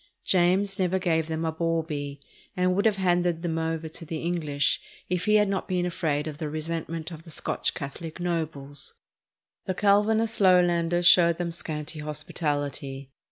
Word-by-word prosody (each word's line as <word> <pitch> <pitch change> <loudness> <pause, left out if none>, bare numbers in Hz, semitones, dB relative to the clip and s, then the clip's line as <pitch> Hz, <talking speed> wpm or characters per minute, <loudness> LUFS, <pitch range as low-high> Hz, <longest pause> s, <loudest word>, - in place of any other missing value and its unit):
James 190 +2 +2
never 185 0 +2
gave 160 -4 +1
them 160 0 -2
a 160 - 0
baw 165 0 0
bee, 145 -3 -5 0.4
and 180 0 +2
would 200 - +1
have 210 -2 +1
handed 175 -2 +1
them 165 -2 -1
over 160 0 -2
to 160 +2 -6
the 165 0 -4
English 155 -5 0 0.3
if 180 -1 -1
he 215 0 +4
had 210 -1 +5
not 195 -1 -2
been 180 -1 0
afraid 155 -4 -1
of 155 -2 -6
the 155 - -3
resentment 165 +1 -3
of 160 -2 -8
the 165 - -14
Scotch 155 - -2
Catholic 155 +4 -6
nobles. 155 -5 -3 0.7
The 185 - -1
Calvinist 215 +3 +3
Lowlanders 175 -2 +4
showed 170 -1 +7
them 175 -1 -2
scanty 155 -2 -4
hospitality. 145 -3 -3
165 Hz, 165 wpm, -27 LUFS, 155-180 Hz, 0.7 s, showed